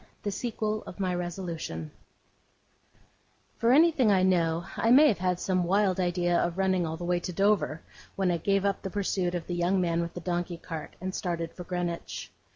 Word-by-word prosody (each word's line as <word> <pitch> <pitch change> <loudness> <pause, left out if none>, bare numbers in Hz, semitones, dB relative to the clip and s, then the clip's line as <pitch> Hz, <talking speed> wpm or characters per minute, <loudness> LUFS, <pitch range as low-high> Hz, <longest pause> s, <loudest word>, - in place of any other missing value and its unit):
THE 205 - -1
SEQUEL 215 0 -2
OF 180 - -9
MY 185 -2 0
RESOLUTION 170 - -4 1.7
For 230 +1 +3
anything 285 -5 +5
I 190 -2 +4
know, 170 -2 +2
I 225 - +1
may 280 +5 +8
have 205 - 0
had 180 -1 0
some 185 -2 +1
wild 190 +1 +2
idea 175 -1 +1
of 175 +1 -1
running 185 -3 +1
all 160 0 -4
the 175 - -7
way 175 0 +1
to 180 - -5
Dover, 195 -4 +1 0.3
when 190 -2 +1
I 170 - +1
gave 195 +3 +1
up 200 -1 0
the 195 - -4
pursuit 185 -2 -1
of 170 - -3
the 175 - -4
young 175 +2 +1
man 170 -2 +1
with 170 0 -5
the - - -4
donkey 175 0 -2
cart, 165 -2 -7
and 185 +1 -4
started 170 -3 -3
for 180 - -9
Greenwich. 175 -1 -4
180 Hz, 195 wpm, -28 LUFS, 175-195 Hz, 1.7 s, may